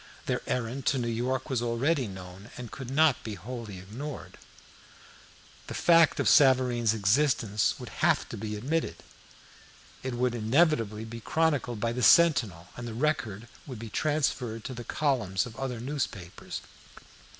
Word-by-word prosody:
Their - - -1
errand 125 +2 -2
to 135 - +3
New 120 -2 -1
York 125 +3 -1
was 130 -5 -1
already 125 +4 +1
known, 95 +2 -10
and 125 -3 -7
could 135 -3 -7
not 150 -1 +3
be 110 -2 -5
wholly 110 0 -7
ignored. 120 +10 -8 1.3
The - - -6
fact 165 -3 +5
of - - +1
Savareen's 125 -5 +4
existence 110 -1 +2
would - - -8
have - - +3
to - - -6
be 105 0 -4
admitted. 145 +10 -1 1.1
It 130 -1 -4
would 125 0 +1
inevitably 115 -2 +2
be 115 +1 -7
chronicled 145 -4 0
by 115 +2 0
the 125 +2 -3
Sentinel, 115 - +4
and 120 0 -6
the 115 - -6
record 120 -6 -1 0.2
would 130 -4 -6
be 115 +1 -7
transferred 135 -7 -1
to 130 - -5
the 120 -1 -7
columns 120 -11 0
of 120 -2 -10
other 130 -3 -3
newspapers. 120 - -5
120 Hz, 150 wpm, -28 LUFS, 110-135 Hz, 1.3 s, fact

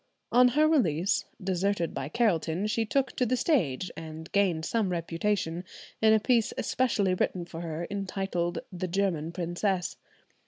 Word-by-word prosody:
On 250 +1 +7
her 310 +1 +6
release, 195 - +2 0.2
deserted 190 -2 0
by 135 - -4
Carelton, 175 -3 +1
she 225 +1 0
took 270 +2 +1
to - - +2
the 255 +2 +1
stage, 185 - +1
and 160 0 -8
gained 180 -6 +2
some 220 -4 0
reputation, 170 0 -1 0.4
in 220 0 +6
a 220 - +5
piece 230 0 +2
especially 215 -7 +1
written 180 -1 -1
for 165 -1 -8
her 165 0 -4
entitled 195 -3 -2 0.2
the 185 +1 -3
"German 170 -4 0
Princess." 175 +2 -1
185 Hz, 150 wpm, -28 LUFS, 170-215 Hz, 0.4 s, On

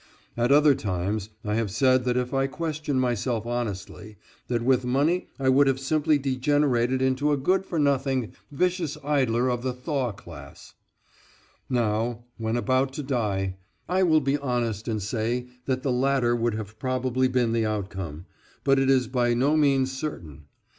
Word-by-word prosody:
At 120 +2 +1
other 145 0 +6
times 100 -1 -2 0.2
I 105 - -1
have 110 -1 0
said 130 +4 +2
that 125 0 +1
if 125 +1 -2
I 135 0 +2
question 150 -1 -2
myself 120 -2 -1
honestly 105 -3 -5 0.3
that 120 -2 -1
with 130 0 +3
money 145 +8 +1
I 135 - -1
would 135 +2 +5
have 135 -1 +1
simply 150 +2 +2
degenerated 130 -2 +1
into 130 +3 +1
a 145 - +2
good 185 +7 +1
for 170 - -3
nothing 135 -4 +1 0.2
vicious 175 0 -1
idler 130 -4 +1
of 120 -1 -1
the 130 0 -2
Thaw 125 -1 -2
class. 85 -9 -12 1.0
Now, 115 -1 0 0.2
when 115 +1 -1
about 130 +2 +1
to 150 +1 -5
die, 100 -8 -1 0.3
I 185 +2 +1
will 160 -4 +4
be 140 +1 0
honest 120 -5 -2
and 110 -4 -2
say 120 +3 -2 0.2
that 130 -1 -1
the 135 - 0
latter 125 -1 +2
would 120 -1 0
have 110 -1 -7
probably 130 0 0
been 125 -2 +1
the 115 -1 +1
outcome, 95 -6 -4 0.4
but 135 -1 +3
it 135 0 +2
is 130 -3 +3
by 120 -1 +1
no 140 +5 +2
means 135 -3 +3
certain. 85 - -6
130 Hz, 165 wpm, -26 LUFS, 115-140 Hz, 1.0 s, other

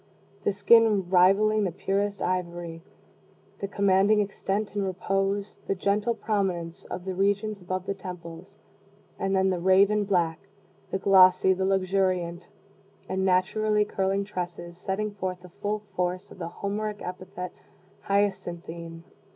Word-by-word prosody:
the - - +2
skin 205 -1 +4
rivaling 200 +4 +5
the 185 - 0
purest 200 +3 -1
ivory, 175 -2 -3 0.8
the 200 - -3
commanding 200 +1 +3
extent 200 0 -2
and 205 -1 -1
repose, 195 +2 -1
the 195 - 0
gentle 205 +4 0
prominence 190 -7 -2
of 180 - -6
the 190 - -2
regions 200 +2 0
above 185 +1 -3
the 195 - -1
temples; 180 0 -9 0.6
and 195 0 0
then 190 0 +3
the 180 - -1
raven 195 +3 +4
black, 175 -5 +1 0.5
the - - -1
glossy, 190 -1 +6
the 190 0 -1
luxuriant, 185 -2 0 0.6
and 190 0 -1
naturally 210 +3 +2
curling 195 0 0
tresses, 175 -3 -6
setting 195 +4 -3
forth 185 -2 -4
the 180 - -12
full 210 +1 -2
force 180 0 -2
of - - -13
the 165 - -4
Homeric 205 +3 -4
epithet, 180 0 -6 0.5
"hyacinthine!" 170 -4 -2
190 Hz, 135 wpm, -27 LUFS, 180-200 Hz, 0.8 s, glossy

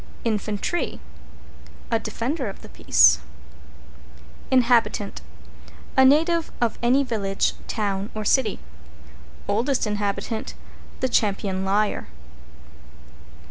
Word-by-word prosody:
=INFANTRY= 215 - -2 0.9
A 230 - +2
defender 250 +3 -3
of 195 - -11
the - - -11
peace. 75 0 +5 1.3
=INHABITANT= 235 -5 +2 0.7
A 265 - +6
native 320 +5 +3
of 235 -2 0
any 255 +4 +3
village, 200 -6 -1
town 200 -2 -2
or 215 -1 -4
city. 225 -2 +2 0.9
=OLDEST 235 +7 +1
INHABITANT= 210 +1 -3 0.5
The 260 - +1
Champion 195 -4 0
Liar. 205 +2 0
220 Hz, 90 wpm, -24 LUFS, 200-255 Hz, 1.3 s, A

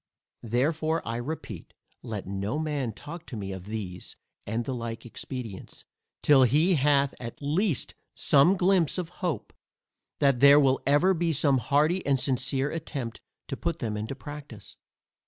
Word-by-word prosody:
Therefore 155 +7 0
I 115 +1 -2
repeat, 145 +7 -6 0.3
let 105 -4 -5
no 100 +7 -3
man 150 -6 -1
talk 155 - -9
to 120 - -6
me 100 -2 -5
of 95 0 -7
these 100 -5 -6 0.3
and 115 +3 -2
the 135 - -2
like 115 -1 -5
expedients, 120 -4 -8 0.4
till 145 -3 +6
he 150 - +4
hath 140 -2 +3
at 120 -1 -7
least 155 - 0 0.2
some 150 +7 +4
glympse 180 -3 +2
of 180 -3 -3
hope, 170 - -2 0.6
that 140 -3 +3
there 140 +2 +8
will 135 -2 +3
ever 145 +7 +4
be 170 -1 0
some 140 -2 +3
hearty 150 +8 +2
and 135 -2 +2
sincere 130 +2 0
attempt 140 -7 -5 0.3
to - - -3
put 170 +3 -2
them 110 -7 -3
into 110 +6 -4
practice. 145 -7 -10
140 Hz, 155 wpm, -27 LUFS, 115-155 Hz, 0.6 s, there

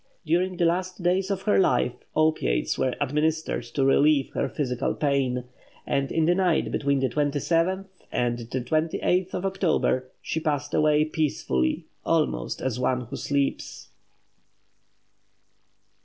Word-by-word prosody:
During 180 +3 +1
the 170 - +2
last 180 +2 -1
days 185 +2 +1
of 195 -1 -2
her 210 - +3
life, 125 -7 +2 0.2
opiates 155 - +1
were 130 - 0
administered 150 +3 0
to 135 - +2
relieve 140 0 +3
her - - -1
physical 125 -5 -2
pain; 135 -4 0 0.4
and 140 0 -1
in 160 -1 +2
the 175 - +4
night 180 -3 +1
between 140 -1 +1
the 135 - +2
27th 165 +7 0 0.3
and 120 -1 0
the 120 +2 -4
28th 165 +6 0
of 180 - -3
October, 170 -9 0
she 160 - -3
passed 145 -2 -2
away 150 0 +3
peacefully, 140 - -1 0.2
almost - - 0
as 125 -2 -1
one 125 0 +1
who 120 - -7
sleeps. 140 -1 -2
150 Hz, 135 wpm, -25 LUFS, 130-170 Hz, 0.4 s, the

